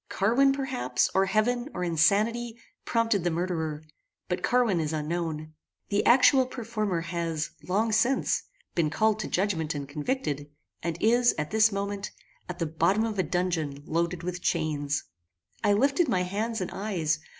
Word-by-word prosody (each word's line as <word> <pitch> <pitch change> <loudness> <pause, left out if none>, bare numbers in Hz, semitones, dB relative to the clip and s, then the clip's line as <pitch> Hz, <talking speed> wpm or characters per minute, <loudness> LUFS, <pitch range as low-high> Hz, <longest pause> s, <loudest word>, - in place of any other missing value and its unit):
Carwin, 240 +8 +3
perhaps, 265 -2 0
or 195 0 +3
heaven, 240 +6 +1
or 180 - -2
insanity, 210 +8 +2 0.3
prompted 230 -5 +1
the 175 - +2
murderer; 160 -3 -2 0.5
but 180 - -1
Carwin 240 -8 +2
is 155 -1 -2
unknown. 155 0 -3 0.4
The 205 0 +1
actual 260 +1 +6
performer 215 -8 -2
has, 165 -2 -3 0.2
long 215 +5 +1
since, 235 +5 +2 0.3
been 165 -3 +1
called 215 +5 +1
to - - -3
judgment 170 -5 -1
and 140 -1 -4
convicted, 145 - -3 0.3
and 170 -1 -3
is, 240 +2 +4
at 150 0 -3
this 220 0 +4
moment, 200 0 -3 0.4
at 180 - -5
the 170 - -1
bottom 170 +7 +1
of 220 -3 -2
a - - +6
dungeon 165 -5 -2
loaded 170 +1 -1
with 180 0 -4
chains." 145 -2 -1 0.6
I 205 - +4
lifted 275 - +3
my 185 -8 +1
hands 215 +4 -2
and 180 - -3
eyes. 185 -7 -1
185 Hz, 155 wpm, -27 LUFS, 165-225 Hz, 0.6 s, actual